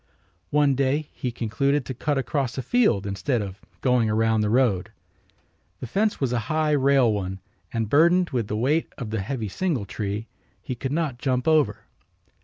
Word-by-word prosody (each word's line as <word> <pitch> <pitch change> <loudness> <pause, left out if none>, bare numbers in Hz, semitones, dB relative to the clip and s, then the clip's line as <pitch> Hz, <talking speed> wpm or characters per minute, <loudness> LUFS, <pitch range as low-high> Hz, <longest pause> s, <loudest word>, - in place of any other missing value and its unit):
One 145 -1 +3
day 140 +3 0
he 125 - -3
concluded 140 +4 0
to 130 - -4
cut 145 +3 -1
across 135 -1 -1
a 130 - -2
field 165 - +2
instead 100 +6 -1
of 100 0 -8 0.2
going 125 -4 +2
around 110 0 +2
the 105 - +1
road. 115 -6 +2 0.9
The - - -5
fence 205 - 0
was 130 -3 0
a 120 - +1
high 155 0 +1
rail 135 -5 +4
one 95 -2 -3 0.3
and, 115 -2 -1
burdened 170 - +4
with 120 -6 -1
the 105 - -2
weight 145 +8 +1
of 120 -6 -5
the 110 - -1
heavy 110 +1 -3
singletree, 105 - -2 0.4
he 130 - -4
could 130 +2 -4
not 150 -6 -1
jump 125 0 0
over. 145 -11 +3
125 Hz, 175 wpm, -24 LUFS, 110-145 Hz, 0.9 s, rail